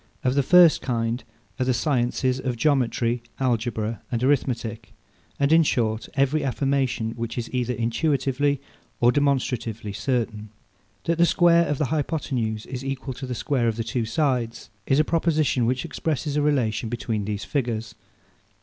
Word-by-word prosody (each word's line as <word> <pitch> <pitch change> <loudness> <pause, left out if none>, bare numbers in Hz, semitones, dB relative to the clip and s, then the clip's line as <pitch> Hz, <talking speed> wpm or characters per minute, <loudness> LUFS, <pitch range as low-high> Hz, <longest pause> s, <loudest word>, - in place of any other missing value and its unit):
Of 125 - +2
the 140 - +3
first 170 +3 +6
kind 115 -1 -1 0.4
are - - +2
the 125 -1 +1
sciences 130 -1 0
of 125 -2 -2
Geometry, 120 -3 +1 0.2
Algebra, 115 -3 -1
and 120 0 -1
Arithmetic; 120 -5 -1 0.4
and 140 +2 +3
in 165 - +7
short, 115 -7 0
every 140 +2 +2
affirmation 135 -4 0
which 115 +1 -5
is 120 +1 -4
either 125 -1 0
intuitively 135 +3 0 0.4
or 120 +1 +5
demonstratively 125 -6 -1
certain. 110 -1 -2 0.5
That 170 0 0
the 170 - +6
square 170 -1 +4
of 145 - -1
the 150 - +1
hypothenuse 130 -8 -2
is 130 0 -6
equal 135 0 -4
to 130 +1 -7
the 125 - -3
square 120 -1 0
of 115 - 0
the 115 - -2
two 120 0 -2
sides, 125 -2 -1 0.2
is 135 - +3
a - - +5
proposition 155 -7 +1
which 125 +1 0
expresses 150 -2 -2
a 150 - +2
relation 120 -7 +1
between 115 -3 -2
these 105 -1 -3
figures. 115 -5 -2
125 Hz, 160 wpm, -24 LUFS, 115-140 Hz, 0.5 s, in